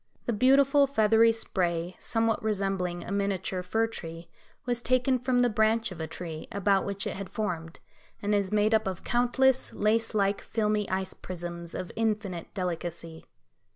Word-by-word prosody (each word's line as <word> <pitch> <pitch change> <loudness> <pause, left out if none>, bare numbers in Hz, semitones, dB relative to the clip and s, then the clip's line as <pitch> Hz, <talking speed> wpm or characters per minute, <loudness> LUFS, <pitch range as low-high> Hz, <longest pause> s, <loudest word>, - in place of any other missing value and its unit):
The 240 - 0
beautiful 275 +5 +5
feathery 225 -3 +4
spray, 180 -5 -1
somewhat 225 -1 0
resembling 195 -4 -1
a - - -7
miniature 195 -2 -1
fir 220 +5 +1
tree, 165 -6 -8 0.4
was 240 -1 0
taken 255 +1 +2
from 250 0 +2
the - - +4
branch 220 0 +2
of 170 -3 -7
a 160 - -3
tree, 160 -3 -6
about 200 0 +2
which 200 0 -3
it - - -3
had 195 -2 -6
formed, 170 -6 -4 0.4
and 205 +1 -1
is 200 -2 +1
made 215 +1 +3
up 220 -2 +3
of 185 -2 -4
countless, 245 +2 +2
lace 225 +1 +1
like, 200 -1 +1
filmy 210 -2 0
ice 190 0 -2
prisms, 170 -1 -6
of 180 - -5
infinite 210 -6 -2
delicacy. 170 -3 -4
205 Hz, 160 wpm, -28 LUFS, 180-225 Hz, 0.4 s, beautiful